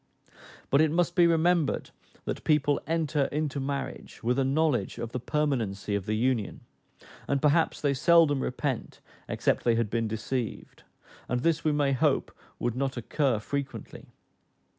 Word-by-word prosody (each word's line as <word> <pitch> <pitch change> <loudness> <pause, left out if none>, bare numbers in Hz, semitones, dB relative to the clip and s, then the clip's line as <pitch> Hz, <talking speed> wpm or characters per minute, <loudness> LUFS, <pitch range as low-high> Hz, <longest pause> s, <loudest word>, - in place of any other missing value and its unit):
But 140 - +5
it 160 - +4
must 175 +2 +1
be 175 -2 +6
remembered 165 -2 +2 0.3
that - - -4
people 145 -2 +2
enter 155 -3 +1
into 150 -1 -2
marriage 140 +1 -5
with 125 +3 +1
a - - +3
knowledge 145 0 +1
of 115 -1 -5
the 125 - -3
permanency 120 -9 -1
of 100 -2 -2
the 110 - 0
union, 115 -2 0 0.7
and 140 - +1
perhaps 150 +4 +2
they 145 -2 +1
seldom 145 0 +4
repent, 130 -1 -3 0.3
except - - 0
they 120 -1 +3
had 115 -2 0
been 115 -1 0
deceived; 110 +2 -4 0.5
and 125 0 0
this 165 +2 +1
we 155 - +2
may 145 -2 +2
hope 130 - +1 0.2
would 120 -1 -2
not 135 0 -2
occur 130 +1 0
frequently. 135 +1 -5
140 Hz, 155 wpm, -28 LUFS, 120-150 Hz, 0.7 s, be